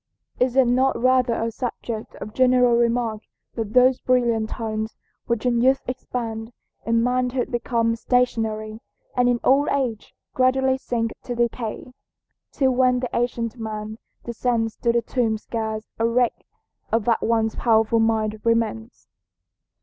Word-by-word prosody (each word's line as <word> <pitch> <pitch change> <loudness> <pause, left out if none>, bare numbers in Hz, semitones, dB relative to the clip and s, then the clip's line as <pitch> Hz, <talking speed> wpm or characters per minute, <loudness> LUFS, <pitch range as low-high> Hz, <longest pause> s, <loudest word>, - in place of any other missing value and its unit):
Is 250 0 +1
it 265 -1 +5
not 255 +2 +2
rather 255 -1 +3
a 230 0 -2
subject 230 -2 -5
of 215 - -8
general 250 -1 +4
remark 235 -2 +1 0.3
that 220 -2 -4
those 255 0 +5
brilliant 235 -3 +1
talents 220 -1 -4 0.3
which 235 0 -1
in 240 -1 +2
youth 265 +2 +3
expand, 230 -3 -4 0.4
in 230 0 +2
manhood 250 0 0
become 230 -1 0
stationary, 220 -3 -1 0.4
and 245 0 +3
in 240 -1 +1
old 275 +3 +4
age 250 -6 -2 0.2
gradually 260 +1 +2
sink 230 -3 -2
to 245 - -5
decay? 235 +1 -3 0.6
Till 265 -2 +2
when 250 0 +3
the 250 -1 -4
ancient 235 -1 -2
man 215 0 -5 0.2
descends 235 -1 -1
to 235 - +1
the 235 0 +1
tomb 230 -3 0
scarce 220 0 -4
a 225 - +2
wreck 240 0 0 0.4
of 225 -2 +1
that 230 -2 +2
once 225 -1 +1
powerful 225 -1 +2
mind 220 -1 0
remains. 230 0 -1
235 Hz, 140 wpm, -23 LUFS, 225-250 Hz, 0.6 s, it